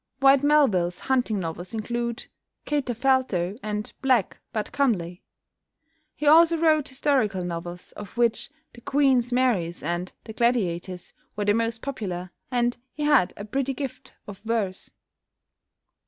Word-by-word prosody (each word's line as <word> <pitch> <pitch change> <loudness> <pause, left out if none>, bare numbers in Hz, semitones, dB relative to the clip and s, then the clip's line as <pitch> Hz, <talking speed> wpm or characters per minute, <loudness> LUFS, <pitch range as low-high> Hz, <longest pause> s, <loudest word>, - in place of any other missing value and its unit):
Whyte 275 0 +6
Melville's 220 -13 +3
hunting 250 -6 0
novels 175 +4 -5
include 235 +1 -3 0.4
"Katerfelto" 255 -8 0
and 210 0 -4
"Black 255 -6 +2
but 215 -2 -3
Comely." 180 -11 0 0.9
He 300 - -5
also 330 +3 +6
wrote 315 -3 +3
historical 260 -9 0
novels, 175 +1 -6
of 210 +2 -10
which 235 0 +1 0.2
"The 240 - -14
Queen's 265 -3 +2
Maries" 230 -10 +1
and 175 +3 -2
"The 220 - -9
Gladiators" 185 -7 -1 0.2
were 205 0 -2
the 205 - +4
most 230 0 -1
popular, 185 -10 -4 0.2
and 245 -1 0
he 300 - -4
had 295 -11 +4
a 205 - -6
pretty 270 +4 -2
gift 270 -2 -6
of 200 -2 -9
verse. 220 -4 -2
230 Hz, 130 wpm, -25 LUFS, 185-265 Hz, 0.9 s, Whyte